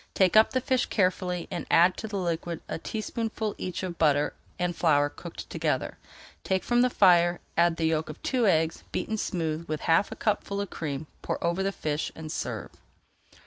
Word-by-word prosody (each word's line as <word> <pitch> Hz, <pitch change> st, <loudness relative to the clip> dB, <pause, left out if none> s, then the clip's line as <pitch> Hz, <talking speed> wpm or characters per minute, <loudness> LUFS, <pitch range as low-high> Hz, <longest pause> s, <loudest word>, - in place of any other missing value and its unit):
Take 190 Hz, 0 st, +3 dB
up 220 Hz, +1 st, +7 dB
the 255 Hz, -, 0 dB
fish 255 Hz, 0 st, +1 dB
carefully 180 Hz, -3 st, 0 dB
and -, -, -4 dB
add 175 Hz, +2 st, +5 dB
to 220 Hz, -, -5 dB
the 205 Hz, -2 st, -4 dB
liquid 170 Hz, -2 st, -2 dB
a -, -, -4 dB
teaspoonful 220 Hz, +1 st, -3 dB
each 185 Hz, 0 st, -4 dB
of 175 Hz, -2 st, -5 dB
butter 145 Hz, -2 st, +3 dB, 0.2 s
and 180 Hz, -1 st, -1 dB
flour 145 Hz, -3 st, +3 dB
cooked 170 Hz, +3 st, -9 dB
together. -, -, -2 dB, 0.4 s
Take 190 Hz, -1 st, 0 dB
from 240 Hz, 0 st, +3 dB
the 250 Hz, -, +4 dB
fire, 175 Hz, -5 st, +5 dB, 0.2 s
add 170 Hz, 0 st, +4 dB
the 165 Hz, -, -1 dB
yolk 160 Hz, -1 st, 0 dB
of 155 Hz, -, -8 dB
two 250 Hz, -4 st, +2 dB
eggs, 160 Hz, -3 st, +2 dB
beaten 220 Hz, -, -2 dB
smooth 165 Hz, -5 st, -2 dB
with 155 Hz, 0 st, -3 dB
half 165 Hz, +5 st, +3 dB
a -, -, -5 dB
cupful 200 Hz, -1 st, -1 dB
of 200 Hz, -2 st, -3 dB
cream; 150 Hz, -2 st, -4 dB, 0.2 s
pour -, -, -2 dB
over 170 Hz, +2 st, +1 dB
the 195 Hz, +1 st, 0 dB
fish 155 Hz, -5 st, -2 dB
and 155 Hz, -1 st, -7 dB
serve. -, -, -4 dB
175 Hz, 190 wpm, -27 LUFS, 160-200 Hz, 0.4 s, up